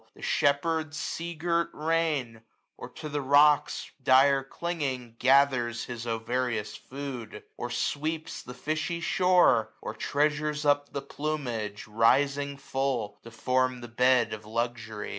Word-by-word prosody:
The - - -14
shepherd's 155 +2 +1
sea 170 +2 -4
girt 170 +1 0
reign; 150 -8 -1 0.3
or, - - -9
to 155 - -8
the 145 -1 -2
rocks 145 +2 +3
Dire 135 +2 +5
clinging, 135 -6 -4
gathers 130 -3 +3
his 120 -1 -6
ovarious 115 -1 -2
food; 130 -5 -7
Or 120 - -5
sweeps 155 +5 -2
the 125 - -10
fishy 155 +4 -2
shore 180 - +3
} - - -36
or - - -6
treasures 150 +5 0
up 145 0 +2
The 140 - -4
plumage, 125 -9 -4
rising 140 +6 +2
full, 135 -5 -2
to 115 - -11
form 130 +2 0
the 120 - -7
bed 125 +1 +3
87^ - - -6
Of 110 0 -8
luxury. 115 -2 -3
135 Hz, 140 wpm, -28 LUFS, 120-150 Hz, 0.3 s, Dire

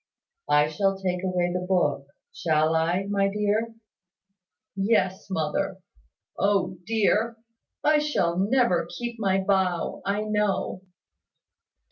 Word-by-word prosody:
"I 150 0 +5 0.2
will 195 -1 +2
take 180 -1 -2
away 180 -1 0
the 180 0 -2
book, 150 -7 +1 0.3
shall 155 -1 +1
I, 170 +4 +1
my 200 -1 +1
dear?" 210 +3 -1 1.0
"Yes, 195 -2 0
mother. 185 +2 -1 0.6
O 190 -3 +1
dear! 225 +1 +1 0.5
I 300 0 +4
shall 185 - 0
never 195 -6 +2
keep 240 -1 -5
my 195 -2 +1
vow, 190 -3 0
I 200 +1 -1
know." 210 -3 -1
195 Hz, 110 wpm, -26 LUFS, 180-210 Hz, 1.0 s, I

